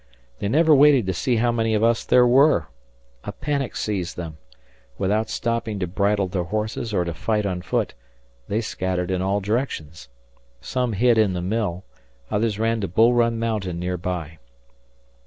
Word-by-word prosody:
They 100 - -2
never 155 +7 +4
waited 140 -5 +6
to 95 - -1
see 120 +8 0
how 120 +1 +2
many 115 -1 0
of 105 - +1
us 115 0 +2
there 125 -1 +5
were. 125 - +4 0.5
A - - -5
panic 140 -4 -3
seized 95 -5 -3
them. 80 -3 -7 0.6
Without 105 +3 0
stopping 115 -2 -2
to 95 - -1
bridle 100 +2 0
their 90 -1 -2
horses 110 +3 -3
or 90 -4 +1
to 85 - -3
fight 105 +5 -1
on 90 -2 -2
foot, 90 - -1 0.5
they 105 +3 0
scattered 95 -4 -2
in 90 -1 0
all 100 +2 0
directions. 95 - -3 0.5
Some 125 - -2
hid 115 +2 +3
in 105 -4 +3
the 90 - -3
mill; 95 -2 -2 0.5
others 105 0 0
ran 115 0 0
to 100 - -1
Bull 115 +7 +4
Run 115 -1 +2
Mountain 105 -6 -2
near 90 +1 -2
by. 85 -3 -5
105 Hz, 175 wpm, -23 LUFS, 90-115 Hz, 0.6 s, waited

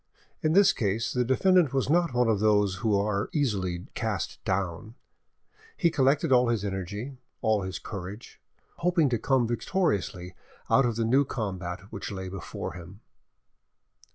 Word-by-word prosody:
In 155 0 +1
this 200 +1 +6
case 110 +3 -1
the 125 - +1
defendant 155 +4 +3
was 135 - +1
not 170 +1 +2
one 125 -1 +3
of 110 -3 +2
those 105 -3 +2
who 105 +1 +1
are 100 0 -1
easily 95 - -1
cast 110 -7 -3
down; 95 +3 -2 0.8
he 170 -3 +3
collected 145 +1 +2
all 125 -1 +5
his 110 -4 0
energy, 100 +7 -5 0.2
all 110 -2 +2
his 95 0 -4
courage, 100 +1 -8 0.4
hoping 170 -4 +2
to 120 -3 0
come 130 +1 +2
victoriously 110 - -1 0.4
out 135 -2 +5
of 115 - -2
the 115 0 0
new 130 +5 +4
combat 95 -8 -4
which 100 - -5
lay 95 -1 -5
before 95 -2 -6
him. 90 +4 -11
110 Hz, 155 wpm, -27 LUFS, 95-135 Hz, 0.8 s, this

